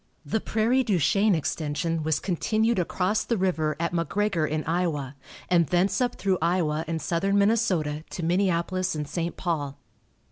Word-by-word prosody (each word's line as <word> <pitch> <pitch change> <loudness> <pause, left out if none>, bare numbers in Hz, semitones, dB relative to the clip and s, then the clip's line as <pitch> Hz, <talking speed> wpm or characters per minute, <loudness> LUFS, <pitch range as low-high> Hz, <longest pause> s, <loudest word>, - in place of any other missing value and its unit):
The 200 +9 -1
Prairie 235 +4 +1
du 205 -6 +1
Chien 200 +5 +3
extension 160 +1 -2
was 155 -1 0
continued 215 +4 0
across 185 +4 0
the 230 - -1
river 165 -5 0
at 170 0 -1
McGregor 170 0 0
in 155 0 -1
Iowa, 160 -5 -1 0.3
and 170 -3 +3
thence 190 +4 +1
up 245 -1 0
through 190 -2 0
Iowa 160 -2 +1
and 165 0 -2
Southern 195 +5 0
Minnesota 195 -8 +1
to 175 - -5
Minneapolis 180 0 0
and 150 -1 -3
St. 170 +2 -3
Paul. 145 -6 -2
175 Hz, 155 wpm, -26 LUFS, 160-200 Hz, 0.3 s, Chien